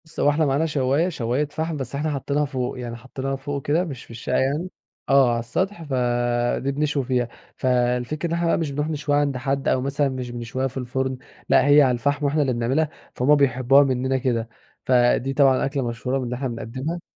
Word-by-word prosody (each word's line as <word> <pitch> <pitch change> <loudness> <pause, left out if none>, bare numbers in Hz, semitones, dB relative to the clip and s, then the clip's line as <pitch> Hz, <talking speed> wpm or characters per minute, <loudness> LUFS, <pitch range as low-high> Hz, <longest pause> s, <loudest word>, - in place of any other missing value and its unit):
بُصّ 160 - -8
هو - - +4
إحنا 150 +2 +2
معانا 140 +3 +1
شوّاية، 150 +2 +1
شوّاية 130 -2 -1
فحم، 160 +2 -3
بس 135 -1 -4
إحنا 150 +2 -1
حاطّينها 145 +1 -1
فوق، 130 -2 -3
يعني 120 -1 -5
حاطّينها 130 +3 -4
فوق 140 0 -5
كده 160 +5 +2
مش 140 -9 -7
في - - -15
الشقة 120 +2 -3
يعني، 145 +7 0 0.4
آه، 135 -2 +5
على 120 - 0
السطح، 185 - -2
فدي 120 -1 0
بنشوي 145 0 0
فيها، 125 -2 0 0.3
فالفكرة 125 +4 0
إن - - -2
إحنا 170 0 0
بقى - - +3
مش 160 -4 -2
بنروح 150 +2 -2
نشويها 145 -1 0
عند 140 -3 0
حد 135 +2 -2
أو 130 - +2
مثلًا 140 +1 0
مش 130 -2 -5
بنشويها 120 +2 -3
في 135 - -9
الفرن، 130 +1 -2 0.3
لأ 130 - +5
هي 145 +1 +7
على 130 -3 +4
الفحم 145 +4 0
وإحنا 145 +2 +2
اللي 135 -3 +1
بنعملها، 130 +7 0 0.3
فهُم 140 +4 +4
بيحبوها 135 0 +4
مننا 130 0 0
كده، 120 -3 -1 0.4
فدي 125 +1 +3
طبعًا 135 -2 +4
أكلة 135 -3 -2
مشهورة 125 +3 -2
من 135 - -2
اللي 125 +1 -3
إحنا 135 +2 -3
بنقدّمها. 130 +8 -5
135 Hz, 205 wpm, -23 LUFS, 125-145 Hz, 0.4 s, هي